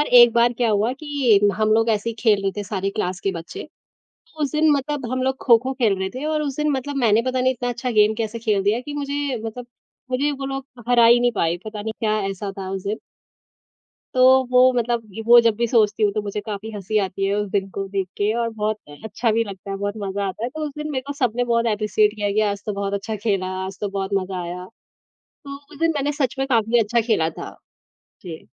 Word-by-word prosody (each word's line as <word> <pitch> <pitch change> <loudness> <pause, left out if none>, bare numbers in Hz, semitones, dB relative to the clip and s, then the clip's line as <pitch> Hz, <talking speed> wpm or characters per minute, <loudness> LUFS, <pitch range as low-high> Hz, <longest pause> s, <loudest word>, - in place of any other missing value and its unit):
और 295 - +2
एक 240 -1 +7
बार 235 +1 +3
क्या 240 0 0
हुआ 215 +3 +1
कि 280 -8 +3 0.2
हम 215 +1 +1
लोग 225 +1 +3
ऐसे 220 +1 0
ही - - -7
खेल 210 -4 +3
रहे 195 - +1
थे 205 - -2
सारे 195 -1 -2
क्लास 185 -3 -3
के 195 - 0
बच्चे 175 - -8 0.7
तो 310 - -12
उस 285 - -1
दिन 310 0 +3
मतलब 285 -1 -2
हम 255 0 -1
लोग 265 0 0
खो-खो 255 +2 +4
खेल 225 -7 +2
रहे 190 - -2
थे। 260 +4 -6
और 310 -1 0
उस 280 -3 -3
दिन 300 0 +1
मतलब 275 +2 -3
मैंने 230 -3 +3
पता 255 0 0
नहीं 260 +1 +3
इतना 245 -1 -4
अच्छा 245 +1 -3
गेम 215 -1 +4
कैसे 225 0 -3
खेल 215 -4 0
दिया, 210 +4 +1
कि 290 +3 -8
मुझे 285 -2 -2
मतलब 235 +2 -6 0.4
मुझे 275 +4 +1
वो 275 -1 -6
लोग 270 0 -4 0.2
हरा 240 -1 +5
ही 240 +1 +6
नहीं 245 0 +2
पाएँ। 170 -6 0
पता 215 -1 -6
नहीं 220 +1 -3
क्या 215 -1 +1
ऐसा 195 +1 -5
था 190 -1 -5
उस 195 -1 -4
दिन। 210 +2 -2 1.2
तो 255 - +2 0.3
वो 250 - +5
मतलब 240 -1 0 0.2
वो 240 0 +9
जब 230 -2 +2
भी 235 0 +1
सोचती 220 -2 +2
हूँ, 205 - +3
तो 215 - -1
मुझे 205 0 -4
काफ़ी 215 0 -5
हँसी 205 +2 -2
आती 190 +1 -3
है 195 - 0
उस 205 -1 -2
दिन 195 -1 -1
को 195 0 -2
देख 195 -1 -2
के 205 +1 +1
और 230 -1 0
बहुत 215 -1 -2 0.3
अच्छा 220 +2 0
भी 230 +1 +2
लगता 195 -2 -8
है, 195 - -3
बहुत 205 +1 -2
मज़ा 200 0 -3
आता 190 +4 -6
है। 240 - -1
तो 310 +2 -5
उस 295 - -5
दिन 300 0 -4
मेरे 260 -2 -2
को 285 - -3
सबने 245 -4 0
बहुत 235 -1 +1
एप्रिशिएट 210 0 +1
किया 205 -1 -1
है 200 - -1
कि 215 - +2
आज 200 0 -7
तो 210 - -2
बहुत 200 0 -3
अच्छा 200 +2 -3
खेला, 200 -3 -1 0.2
आज 190 0 -7
तो 205 - -1
बहुत 195 0 -3
मज़ा 185 -1 -5
आया। 180 +1 -6 0.6
तो 280 -1 -11 0.2
उस 290 - -13
दिन 330 0 +3
मैंने 285 +1 0
सच 255 - 0
में 270 - 0
काफ़ी 230 -2 +2
अच्छा 230 +2 +1
खेला 165 -9 +2
था। - - -9 0.7
जी। 165 - -9
225 Hz, 250 wpm, -22 LUFS, 200-255 Hz, 1.2 s, वो